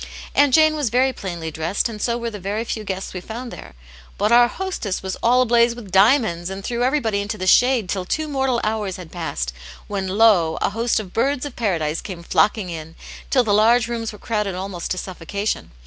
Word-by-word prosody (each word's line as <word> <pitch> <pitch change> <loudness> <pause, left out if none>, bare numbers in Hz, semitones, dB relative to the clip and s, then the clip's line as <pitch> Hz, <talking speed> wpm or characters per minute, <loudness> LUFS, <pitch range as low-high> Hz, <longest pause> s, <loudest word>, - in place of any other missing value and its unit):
Aunt 285 -1 +4
Jane 310 +2 +5
was 290 -6 0
very 255 +3 +2
plainly 170 -6 -5
dressed, 160 +8 -1
and 215 -3 -8
so 235 -1 0
were 235 -1 -4
the 210 - -7
very 200 +4 -2
few 225 -2 -4
guests 190 -2 -5
we 180 - -5
found 235 +5 -7
there; - - -11 0.4
but 210 +2 +1
our 240 0 +7
hostess 305 - -4
was 190 0 -3
all 250 +2 +4
ablaze 235 -1 +3
with 220 -6 -10
diamonds, 195 -4 +3
and 195 +1 -6
threw 240 +2 -2
everybody 245 -6 +1
into 210 +1 -4
the 185 - -4
shade 245 +2 +4
till 185 0 -2
two 310 +12 -2
mortal 265 -4 0
hours 210 -3 -1
had 180 -3 -10
passed, - - -4 0.3
when 195 -2 -3
lo 190 -5 +4
1 - - -5
a - - +2
host 230 +2 0
of 190 -4 -8
birds 275 +4 0
of 285 - -7
Paradise 165 -8 -1
came 175 -3 -8
flocking 205 +1 +1
in, 160 0 -8 0.3
till 255 -3 +4
the 210 -3 +1
large 225 +3 +4
rooms 230 -1 -3
were 210 - -11
crowded 210 -3 -2
almost 185 -1 -5
to 185 - -1
suffocation. 190 +3 -4
215 Hz, 215 wpm, -21 LUFS, 185-240 Hz, 0.4 s, our